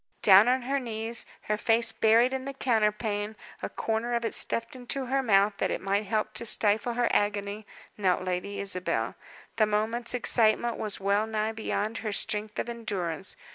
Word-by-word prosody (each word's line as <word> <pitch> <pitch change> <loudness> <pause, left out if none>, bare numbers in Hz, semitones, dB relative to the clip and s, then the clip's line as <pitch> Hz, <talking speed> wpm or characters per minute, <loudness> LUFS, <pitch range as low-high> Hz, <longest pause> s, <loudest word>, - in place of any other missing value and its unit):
Down 200 +2 +8
on 255 0 +2
her 275 +3 0
knees, 230 -1 -4 0.2
her 210 - -1
face 225 +1 +3
buried 230 +4 +3
in 265 0 -3
the 275 0 -6
counterpane, 215 -3 0 0.3
a - - -3
corner 225 +2 -2
of 235 0 -1
it - - 0
stuffed 230 +2 +1
into 255 +2 -3
her 270 +2 0
mouth 205 -4 +3
that - - +1
it - - -2
might 200 +2 -1
help 215 +1 -1
to 235 - -2
stifle 215 +3 +1
her 240 0 +2
agony, 205 0 -1 0.3
knelt 185 -2 +1
Lady 185 +2 -3
Isabel. 190 -2 -1 0.4
The 215 - +4
moment's 225 +4 0
excitement 235 -1 +2
was 210 -2 -1
well 200 +2 +1
nigh 220 0 -1
beyond 220 0 -3
her 215 - -3
strength 210 +1 -1
of - - -2
endurance. 195 -7 -4
220 Hz, 175 wpm, -28 LUFS, 205-235 Hz, 0.4 s, Down